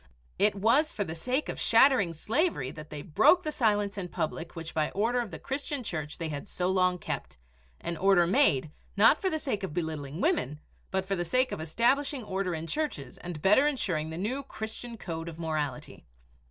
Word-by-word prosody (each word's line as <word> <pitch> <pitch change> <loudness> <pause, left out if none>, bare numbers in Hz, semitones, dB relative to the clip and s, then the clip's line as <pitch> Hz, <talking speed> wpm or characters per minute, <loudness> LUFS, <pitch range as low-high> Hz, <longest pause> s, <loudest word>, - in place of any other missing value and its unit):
It 205 0 +4
was 235 +10 +3
for 205 - -1
the 160 - -5
sake 250 - -1
of - - -5
shattering 230 -6 +5
slavery 220 - 0
that 150 0 -10
they 150 -1 -6
broke 215 - +4
the 305 - -2
silence 205 -6 +1
in 180 - -3
public 165 -1 -4
which 165 -1 -6
by 155 -1 +1
order 235 +5 +1
of 235 - -5
the - - -7
Christian 280 0 -4
Church 155 -7 -4
they 165 - -3
had 145 +6 -6
so 180 0 -1
long 185 -1 +2
kept - - -5 0.4
an 170 -1 -3
order 190 0 +5
made, 170 - +3 0.3
not 220 +9 +6
for 380 - +1
the 315 - -1
sake 260 -9 -2
of 190 -5 -5
belittling 155 -3 -3
women, 295 - 0 0.3
but 190 -1 -1
for 195 +1 -1
the 175 - -1
sake 255 +9 +1
of - - -4
establishing 245 - +1
order 190 -3 -2
in 160 0 -4
churches 295 - -3
and 175 -4 -7
better 210 +9 +5
insuring 180 - -1
the 160 - -6
new 230 +9 -2
Christian 230 -1 -7
code 165 -4 -5
of 160 - -10
morality. 155 -5 -3
190 Hz, 200 wpm, -29 LUFS, 160-245 Hz, 0.4 s, not